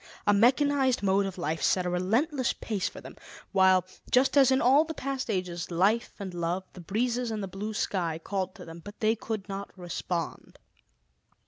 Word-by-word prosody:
A 205 - +5
mechanized 260 +3 +3
mode 195 0 +3
of 190 - -7
life 160 -2 -2
set 185 -1 +2
a - - 0
relentless 240 - +1
pace 210 -4 -2
for - - -11
them, - - -11 0.4
while, 190 -1 +4 0.2
just 260 +3 +3
as 275 -2 +7
in 260 0 +4
all 275 +5 +5
the 320 0 -6
past 270 -2 -3
ages, 180 -4 -2
life 195 +7 +1
and 195 -3 -6
love, 175 +2 -2
the 180 - -10
breezes 235 +6 -1
and 215 -2 -3
the - - -3
blue 205 +3 -5
sky 170 -6 -1
called 190 +2 -3
to 185 - -10
them; 165 0 -10
but 205 0 -11
they 220 +1 +2
could 220 -2 -5
not 200 0 -5
respond. 175 -1 -4
200 Hz, 190 wpm, -28 LUFS, 180-240 Hz, 0.4 s, as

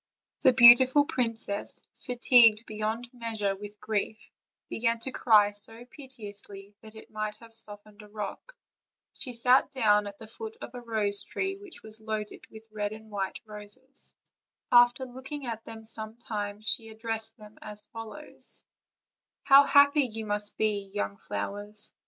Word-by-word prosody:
The 260 - +6
beautiful 255 +4 +8
princess, 230 -6 -2 0.2
fatigued 235 -3 +5
beyond 220 +3 -4
measure 220 -5 -2
with 205 +1 -10
grief, 215 +1 -3 0.4
began 230 0 0
to 265 - -2
cry 210 -5 +4
so 225 +3 -2
piteously 210 -8 -5
that 220 -1 -14
it 220 - -13
might 215 0 -3
have 230 +1 -16
sof 205 -2 -3
tened 210 0 -17
a 210 - -13
rock. 215 - -7 0.6
She 255 - -3
sat 250 +4 +4
down 210 -6 +3
at 200 0 -9
the 220 - -11
foot 440 - -9
of - - -9
a 245 - -7
rose 215 -4 +1
tree 385 +1 -3
which 395 -2 -13
was 220 0 -8
loaded 215 -1 -5
with 220 0 -13
white 210 -1 -3
and 220 0 -12
red 195 -2 -3
roses. 210 +5 -10 0.6
After 245 +2 +6
look 260 +2 -11
ing 290 -2 -5
at 225 -2 -5
them 225 -1 -10
some 220 0 -4
time, 210 -3 -5
she 225 +1 0
addressed 225 +1 -4
them 210 -1 -15
as 210 0 -3
follows: 225 +7 -5 0.8
"How 275 +1 +8
happy 285 +1 +6
you 225 -2 -6
must 205 0 -2
be, 205 -2 -1
young 100 - -3
flowers! 205 - -4
220 Hz, 160 wpm, -28 LUFS, 210-245 Hz, 0.8 s, beautiful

